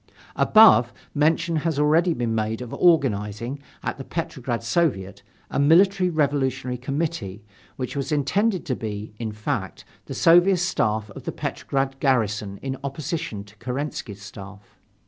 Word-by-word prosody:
Above, 215 - +6 0.2
mention 160 +3 +2
has 160 -1 -1
already 155 +4 +3
been 120 -7 -1
made 110 0 -1
of 125 -2 -7
organizing, 120 - +1 0.2
at - - -3
the - - -5
Petrograd 130 -7 -4
Soviet, 115 - 0 0.3
a - - -1
Military 180 +5 +4
Revolutionary 135 -5 0
Committee, 125 - -3 0.3
which 130 +1 -5
was 140 0 -3
intended 185 +8 +1
to 130 -6 -1
be, 105 -1 -6
in 115 -2 -3
fact, 105 0 -4 0.2
the - - -6
Soviet 175 +3 +5
Staff 110 - 0
of - - -11
the - - -2
Petrograd 135 -1 -3
garrison 105 -6 0
in 135 0 -3
opposition 140 - -4
to 100 +1 -18
Kerensky's 125 -5 -5
Staff. 100 0 -12
135 Hz, 140 wpm, -24 LUFS, 110-160 Hz, 0.3 s, Above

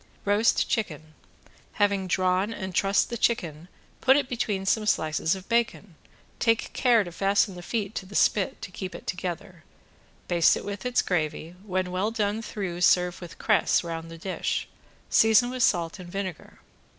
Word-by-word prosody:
~ROAST 205 +3 +3
CHICKEN~ 155 -8 -3 0.6
Having 200 -2 +1
drawn 185 +3 +1
and 190 -4 -5
trussed 195 +2 +2
the 235 - -3
chicken 170 -9 -1 0.3
put 265 +1 +5
it 280 -3 0
between 215 -6 -2
some 215 +2 +1
slices 160 -2 +1
of 190 0 -10
bacon, 230 -5 0 0.5
take 230 -1 +1
care 240 -4 +4
to 175 - -8
fasten 195 +3 +1
the 180 - -9
feet 210 +2 -3
to 190 - -5
the 200 - -11
spit 200 -3 +1
to - - -7
keep 185 0 -6
it - - -10
together, 180 -2 -5 0.6
baste 170 -2 +4
it - - -7
with 205 +3 -4
its 250 - +1
gravy, 160 -1 -2
when 185 -2 -2
well 185 +4 0
done 215 -1 -1
through, 190 -6 -5
serve 180 0 +3
with 175 -1 -10
cress - - +2
round 165 -1 -5
the 165 - -9
dish, 185 +3 -3 0.4
season 225 +3 +4
with 255 0 -4
salt 170 -3 +1
and 180 -1 -9
vinegar. 195 -2 -6
190 Hz, 170 wpm, -26 LUFS, 175-215 Hz, 0.6 s, put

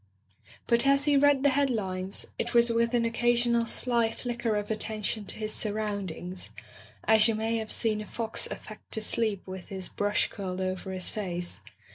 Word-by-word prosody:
But 235 +3 +4
as 275 +1 +4
he 295 -1 +4
read 280 -1 +4
the 285 - +6
headlines, 205 -9 -1
it - - -2
was 235 0 +6
with 230 +1 +1
an 235 -1 +2
occasional 235 0 +2
sly 235 -2 +2
flicker 235 -2 -2
of 210 +1 -2
attention 215 -1 -1
to - - -3
his 215 0 -3
surroundings, 200 -4 -3 0.5
as 220 0 +5
you 225 - +1
may 225 +1 0
have 220 -1 -4
seen 215 -2 +2
a 210 - -8
fox 225 -1 -3
affect 215 - -10
to 220 - +2
sleep 215 -3 -1
with 185 -1 -8
his 190 -2 -4
brush 205 0 +1
curled 185 -2 -5
over 185 0 -3
his 185 -1 0
face. 180 -4 -4
220 Hz, 175 wpm, -28 LUFS, 200-235 Hz, 0.5 s, the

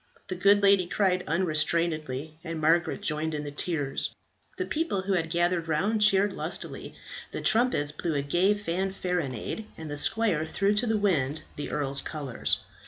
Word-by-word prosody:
The 185 - -2
good 200 +2 +4
lady 195 -3 +5
cried 185 -1 +1
unrestrainedly, 155 -3 0
and 165 -2 -4
Margaret 165 +5 +2
joined 155 -2 -1
in 150 - -3
her 145 - -5
tears. 145 -2 -2 0.4
The 370 - -1
people 310 - -1
who 195 +1 0
had 165 -3 0
gathered 170 0 +1
round 195 +8 +1
cheered 205 -1 +4
lustily; - - -4 0.4
the - - -4
trumpets 225 -11 +3
blew 155 +1 -3
a 140 - 0
gay 175 +8 +2
fanfaronade; 180 - -3
and 160 -2 -7
the 145 - -4
squire 205 -8 +2
threw 200 +5 +1
to 210 +4 +1
the 220 -1 +2
wind 160 -8 0
the 145 - -5
earl's 140 -2 0
colours. 140 -6 -1
170 Hz, 165 wpm, -27 LUFS, 150-200 Hz, 0.4 s, lady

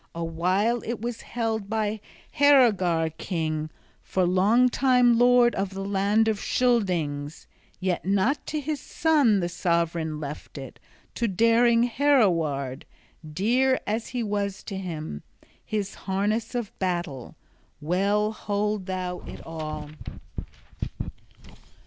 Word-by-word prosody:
A 170 - -3
while 185 +8 +1
it 235 0 -4
was 235 +1 -4
held 225 -4 -3
by 215 -1 -1 0.4
Heorogar 200 - +4
king, 155 -3 -2 0.3
for 185 -1 0
long 200 +8 +4
time 250 -2 +3
lord 245 -1 +5
of 195 0 -3
the 195 0 -4
land 200 +3 +2
of 215 -2 0
Scyldings; 170 - 0 0.3
yet 185 -1 -1
not 200 - +1
to 305 - -2
his 295 0 -3
son 280 -10 +2
the 175 - 0
sovran 170 -2 -1
left 150 0 -7
it, 135 -2 -9 0.3
to 235 - -1
daring 230 +3 +4
Heoroweard, 170 - +1 0.5
dear 250 - +2
as 220 +2 -2
he 245 -1 -3
was 200 -2 -2
to 195 - -6
him, 155 - -5 0.4
his 205 -2 -3 0.2
harness 210 +5 -1
of 235 -4 -2
battle. 175 -9 -3 0.4
Well 200 +7 +1
hold 210 -2 -2
thou 185 -1 -3
it - - -9
all!" 155 -2 -6
200 Hz, 120 wpm, -26 LUFS, 170-235 Hz, 0.5 s, lord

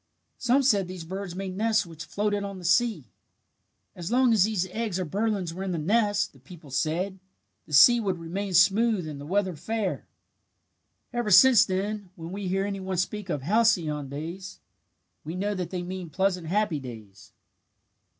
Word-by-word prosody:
Some 255 +3 +3
said 205 -8 +3
these 180 -2 -7
birds 190 +1 -6
made 190 -1 -5
nests 220 0 +1
which 165 -1 -9
floated 205 +3 -1
on 200 -1 -6
the 180 - -10
sea. 225 +6 +2 0.9
"As 175 -1 -6
long 250 -1 +4
as 205 -4 +5
these 205 -4 -1
eggs 215 -4 -2
or 185 - -1
birdlings 195 -1 -1
were 185 - -7
in 190 -1 -2
the - - -2
nest, 205 +5 +1
the 135 - -19
people 150 +1 -14
said, 170 +8 -1 0.5
the 150 - -10
sea 240 - +8
would 195 -5 -1
remain 185 +3 -4
smooth 195 0 +4
and 145 -2 -7
the 145 - -8
weather 190 0 0
fair. 200 +4 -3 1.1
"Ever 240 -3 -1
since 235 +5 +7
then, 200 +1 -3
when 165 -2 -8
we 195 0 -4
hear 195 +2 0
any 200 -1 -3
one 190 -1 -4
speak 195 +2 -2
of 145 -5 -2
'halcyon 170 -7 +1
days,' 170 +7 -7 0.6
we 160 +3 -6
know 205 +3 -1
that 180 -3 -4
they 180 -2 -4
mean 180 -1 -6
pleasant 185 -1 0
happy 195 -3 0
days." 105 -7 -11
190 Hz, 180 wpm, -26 LUFS, 170-205 Hz, 1.1 s, sea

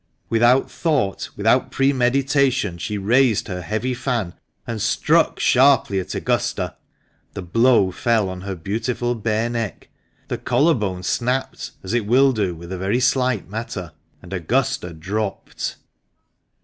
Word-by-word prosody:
Without 120 +3 +3
thought, 140 - -1
without 120 +5 +2
premeditation, 135 - +1
she 105 +4 -3
raised 115 +3 +2
her 90 -1 -4
heavy 110 +8 -2
fan 120 -8 -2 0.3
and 115 -3 -4
struck - - +2
sharply 130 -6 +4
at 90 - -5
Augusta. - - -1 0.6
The 95 - -5
blow 115 +1 +3
fell 115 0 +1
on 95 0 -6
her 95 0 -5
beautiful 115 +7 -2
bare 110 0 -1
neck, 115 -3 -4 0.4
the - - -3
collar 165 +3 +3
bone 95 -7 -3
snapped, 125 +7 -1
as 95 - -4
it 120 -4 0
will 135 +4 +5
do 100 -7 -1
with 85 +2 -10
a 95 - -4
very 100 +6 0
slight 125 -3 +1
matter, 95 -4 -5 0.3
and 90 +1 -9
Augusta 95 0 -1
dropped 95 +6 -4
115 Hz, 135 wpm, -21 LUFS, 95-125 Hz, 0.6 s, will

